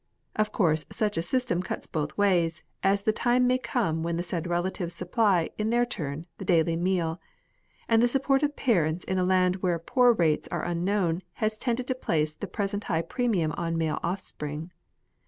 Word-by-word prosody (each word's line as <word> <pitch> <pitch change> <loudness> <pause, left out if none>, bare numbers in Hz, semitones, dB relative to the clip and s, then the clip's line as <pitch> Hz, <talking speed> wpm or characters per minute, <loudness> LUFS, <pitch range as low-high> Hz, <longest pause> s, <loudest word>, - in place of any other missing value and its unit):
Of 215 0 +1
course 160 -6 +2
such 210 -1 -1
a 165 - +1
system 180 -1 0
cuts 185 - -5
both 150 -2 -3
ways, 175 -5 +2 0.2
as 200 +1 +2
the 215 - +2
time 245 +2 +2
may 255 +1 +3
come 195 -12 -1
when 170 +1 -1
the 170 - -1
said 175 -1 -3
relatives 175 0 -2
supply, 195 -4 +1
in 215 +1 0
their 240 +1 +3
turn, 155 - -5
the - - -5
daily 165 -2 +3
meal; 175 -1 0 0.7
and 225 0 +4
the 240 - +5
support 270 +2 +2
of 295 -1 0
parents 175 - +1
in 190 0 -1
a - - +2
land 185 0 +3
where 180 -2 0
poor 245 - +4
rates 165 -9 +1
are - - -3
unknown, 175 0 0
has 215 0 -1
tended 245 0 -1
to 260 - 0
place 155 -11 -1
the 205 - -6
present 205 +1 -2
high 165 0 0
premium 190 -5 0
on 165 -1 -1
male 160 -2 0
offspring. 165 -3 -4
180 Hz, 190 wpm, -27 LUFS, 165-220 Hz, 0.7 s, the